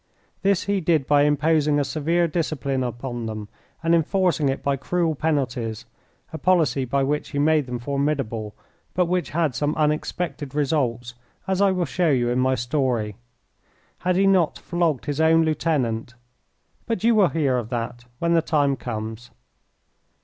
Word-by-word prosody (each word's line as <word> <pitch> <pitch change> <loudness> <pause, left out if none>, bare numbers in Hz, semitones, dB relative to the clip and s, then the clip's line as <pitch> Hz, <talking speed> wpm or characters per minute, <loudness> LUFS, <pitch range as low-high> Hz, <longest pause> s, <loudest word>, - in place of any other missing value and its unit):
This 195 -1 +2
he 200 -1 0
did 160 -4 +2
by 145 0 +4
imposing 150 0 +2
a - - +2
severe 165 +4 0
discipline 150 -5 -1
upon 120 -1 -4
them 110 -1 -6 0.3
and 165 +1 +2
enforcing 170 -2 +2
it 135 - -3
by 140 0 +1
cruel 165 +4 0
penalties, 130 -8 -2 0.5
a 160 - -5
policy 165 -7 +2
by 135 +3 0
which 150 +2 -1
he 145 - -5
made 150 -1 +2
them 125 0 -3
formidable, 130 -5 -2 0.4
but 180 0 +3
which 180 +1 -1
had 160 -4 0
some 145 +4 -1
unexpected 150 -1 -2
results, 125 -5 0 0.3
as 190 0 0
I 200 - +5
will 180 -2 0
show 175 +3 0
you 125 -4 +2
in 125 - +1
my 130 +1 +2
story. 120 -4 -1 0.8
Had 180 0 0
he 195 +2 +3
not 185 -5 +3
flogged 170 -6 -1
his 145 +1 -1
own 160 0 +5
lieutenant 125 -8 -1 0.7
but 225 -5 -2
you 230 +1 +5
will 205 -5 +4
hear 140 -6 +1
of 115 -2 -6
that 120 0 -4
when 170 +3 +1
the 165 - +4
time 145 -3 +1
comes. 110 0 -6
145 Hz, 165 wpm, -23 LUFS, 125-165 Hz, 0.8 s, I